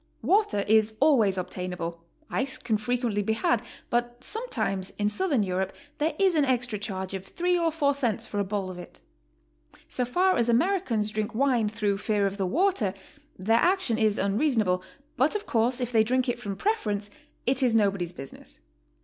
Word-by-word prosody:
Water 395 - +2
is 220 0 +3
always 235 -10 +4
obtainable; 180 -2 -4 0.2
ice 265 +1 -2
can 225 -3 -1
frequently 230 -1 -1
be 220 +2 0
had, 335 +10 +1 0.3
but 240 +1 -1
sometimes 315 - -2
in 205 0 +1
Southern 290 - +1
Europe 190 0 -2 0.3
there 310 +2 0
is 385 -2 +3
an 305 -3 +3
extra 245 -5 0
charge 190 -2 -4
of 190 -1 -4
three 355 - 0
or 335 -2 +1
four 290 -3 +2
cents 245 -7 -1
for 205 - -4
a - - +2
bowl 195 -1 -3
of 180 - -9
it. 175 - -11 0.9
So 250 - -1
far 365 +10 +2
as 235 0 +2
Americans 235 - +1
drink 215 +1 -3
wine 245 -4 +2
through 210 -2 -1
fear 210 -1 +1
of 195 0 -2
the 190 -2 0
water, 280 - +1 0.4
their 225 +5 +2
action 355 - +2
is 215 -2 +2
unrea 205 +10 +1
sonable, 185 -7 +1 0.4
but 275 - +3
of 420 0 -2
course 240 - +1
if 245 -1 -2
they 220 -2 +5
drink 255 +3 +1
it 245 -1 -1
from 205 -4 -4
preference, 210 - -1 0.3
it 260 +2 +2
is 245 -3 +3
nobody's 200 -5 +1
business. 135 -5 -11
225 Hz, 185 wpm, -27 LUFS, 200-275 Hz, 0.9 s, they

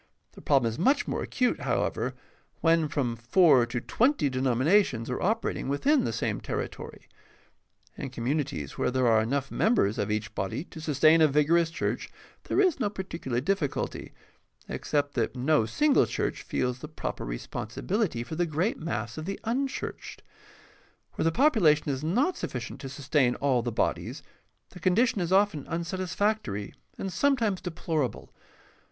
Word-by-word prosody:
The - - -14
problem 135 -5 +3
is 115 +1 -4
much 270 - +3
more - - -2
acute, 250 -2 0
however, - - -1 0.5
when 165 -1 +3
from 135 -5 -1
four 125 +1 +4
to 120 0 -2
twenty 235 - +1
denominations 130 - +2
are 125 - -3
operating 215 -7 -1
within 270 - +2
the - - -1
same - - -2
terri - - -3
tory. - - -11 0.9
In - - -4
communities 120 - -3
where - - +2
there 130 0 +1
are 110 -2 +5
enough 135 +4 -1
members 200 - +2
of 105 - -1
each 110 +1 -2
body 95 +8 -3
to 160 -2 -11
sustain 155 +1 +4
a 155 - +7
vigorous 155 +4 +3
church 165 - -3 0.4
there - - 0
is 370 -8 +3
no 210 -5 +1
particular 165 - -4
difficulty, 155 0 -2 0.6
except 145 -1 -1
that 120 -1 -1
no 130 -2 +2
single 295 - +3
church - - -2
feels 125 0 -2
the 150 - -7
proper 155 - -5
respon - - -5
sibility 180 - -1
for 160 - -8
the 170 +2 0
great 165 +9 -1
mass 120 -6 -4
of 155 - -6
the 195 +2 -4
unchurched. 260 +4 -3 0.9
Where 165 - +1
thepopu 255 - +3
lation 150 -2 +4
is 135 0 -2
not 245 - +1
sufficient 125 +1 -5
to 135 - -6
sustain 140 -2 +1
all 135 -3 +1
the 120 0 -3
bodies, 110 - -2 0.5
the 180 - -11
condition 195 +5 +2
is 175 0 -2
often 190 -7 +2
unsatisfactory 170 - -2 0.2
and 190 -2 -4
sometimes 235 -9 +1
deplorable. 160 - -3
155 Hz, 160 wpm, -28 LUFS, 125-190 Hz, 0.9 s, a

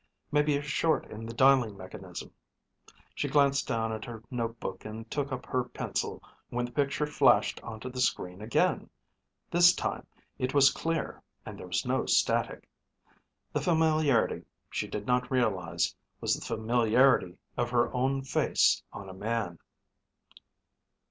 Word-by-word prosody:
Maybe 150 -1 +3
a 145 - -5
short 150 +1 +1
in 110 +1 -7
the 115 - -6
dialing 130 -5 +4
mechanism. 95 -1 -9 0.8
She - - -2
glanced 140 -1 +3
down 115 -1 -1
at 110 0 -5
her 115 -2 -8
notebook 115 -6 -4
and 110 +1 -8
took 140 -1 -2
up 125 -1 -4
her 130 -1 0
pencil 125 - -4 0.3
when 120 0 -1
the 120 - -8
picture 140 +1 0
flashed 150 - +3
onto 115 +1 -7
the 125 0 -4
screen 90 -6 -1
again. 110 +2 +1 0.6
This 175 +1 +6
time - - -3 0.3
it 130 +2 -2
was 140 -1 +7
clear 165 +3 -3 0.2
and - - -8
there - - -8
was - - -1
no - - 0
static. - - +1 0.9
The - - 0
familiarity, 155 -6 +2 0.3
she - - -2
did 105 -1 -5
not 125 0 +1
realize, 95 -10 0 0.2
was - - +1
the - - -3
familiarity 115 -3 +2 0.2
of 120 0 -1
her 120 -1 +1
own 135 +2 0
face 130 - +2
on 100 - -9
a 95 - -8
man. 105 -3 -3
125 Hz, 150 wpm, -29 LUFS, 110-140 Hz, 0.9 s, was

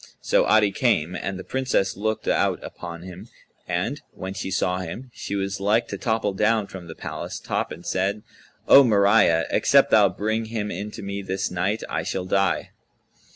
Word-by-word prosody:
So - - +2
Adi 105 -2 +4
came, 90 -8 +1
and 95 0 -4
the 95 - -7
Princess 130 -7 0
looked 110 +2 -2
out - - +2
upon 85 -1 -8
him; 95 +4 -10 0.4
and, - - -2
when 95 0 -6
she 100 -1 -5
saw 90 -1 0
him, 115 +9 -7
she 100 - -5
was 100 0 -2
like 105 +4 +2
to - - -4
topple 110 -3 0
down 110 +2 +2
from 95 -3 -10
the 80 - -9
palace - - -6
top - - -2
and - - -9
said, 100 +3 -1 0.4
"O 140 - +9
Mariyah, 100 -7 +4
except - - +4
thou 105 -3 +6
bring 110 +4 -2
him 110 -2 -3
in 100 +4 -4
to - - -9
me 100 0 -4
this 95 0 -3
night, 95 +5 -1
I - - -2
shall 95 -1 -3
die." 95 +1 0
100 Hz, 185 wpm, -24 LUFS, 95-110 Hz, 0.4 s, O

